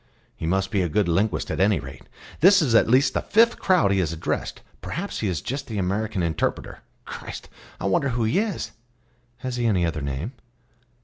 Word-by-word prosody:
"He 80 - -4
must 95 +3 0
be 100 -3 +1
a 90 - 0
good 100 +4 +1
linguist, 100 +4 0
at - - -3
any 100 +1 +3
rate. 70 -1 -11 0.3
This 190 +5 +7
is 140 -9 +1
at 115 - +5
least 130 +2 +4
the - - 0
fifth 230 +3 +3
crowd 180 - +3
he 100 - +2
has 85 -4 0
addressed; 85 0 -3 0.2
perhaps 195 +5 -4
he 110 - -1
is 85 -6 -2
just 135 +3 -4
the 110 - -5
American 100 +1 -1
interpreter. 80 -2 -2 0.3
Christ! - - -8 0.3
I - - -4
wonder 100 +8 +2
who 120 -1 -1
he 110 - +2
is." 210 -4 -2 0.7
"Has 125 -1 -3
he 120 -1 +1
any 95 -6 +2
other 80 -2 -2
name?" 70 - -3
105 Hz, 200 wpm, -24 LUFS, 90-130 Hz, 0.7 s, This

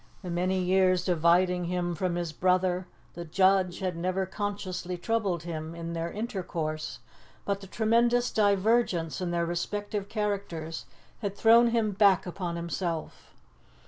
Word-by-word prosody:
The 180 - -5
many 185 +2 0
years 185 0 +3
dividing 180 +1 +3
him 175 0 -1
from 175 +1 -1
his 170 -2 -3
brother, 185 +1 +1 0.3
the 175 - -6
judge, 185 +2 +2
had 185 -2 -1
never 185 +3 -1
consciously 190 -2 -4
troubled 195 -4 -1
him 160 -1 -5
in 170 0 -5
their 165 0 -3
intercourse, 170 -8 -4 0.5
but 200 0 -1
the 195 - -10
tremendous 235 +4 +2
divergence 200 - +2
in 180 - -1
their 170 0 0
respective 200 +4 -3
characters 200 -7 -3 0.3
had 200 -3 -3
thrown 230 +1 +6
him 230 -2 +1
back 195 -1 +4
upon 175 -1 -4
himself. 170 -1 -4
185 Hz, 140 wpm, -28 LUFS, 170-200 Hz, 0.5 s, thrown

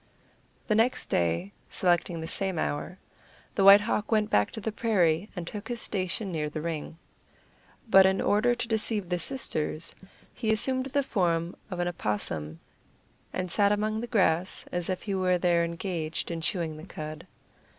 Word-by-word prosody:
The 215 - +1
next 225 +4 +2
day, 85 +3 +1 0.2
selecting 175 -2 +1
the 160 - -5
same 190 0 -1
hour, 155 +4 -2 0.6
the 195 - +1
White 200 +1 +10
Hawk 210 0 -1
went 215 -1 +2
back 105 0 +3
to - - -5
the 220 +1 -3
prairie, 195 -5 +1
and 175 -2 -4
took 210 +4 -7
his 240 -1 -3
station 190 0 -1
near 155 -3 -2
the 155 - -5
ring. 160 0 -4 0.9
But 195 -3 +7
in 190 0 +1
order 230 +4 +3
to 240 -1 -3
deceive 220 -4 -1
the 180 -1 0
sisters, 165 - -1 0.4
he 220 -3 -1
assumed 260 +4 +1
the 280 +1 0
form 175 -7 0
of 180 -3 -5
an 175 - 0
opossum, 80 - -3 0.7
and 185 -1 -3
sat 205 -1 +4
among 215 +1 0
the 240 - -4
grass 185 -5 +1
as 175 0 -2
if 185 - -2
he 200 - -3
were 185 -1 +2
there 175 -1 +2
engaged 170 -1 -3
in 165 -1 -3
chewing 160 -2 -2
the 155 - -9
cud. 155 -1 -7
185 Hz, 170 wpm, -28 LUFS, 165-215 Hz, 0.9 s, White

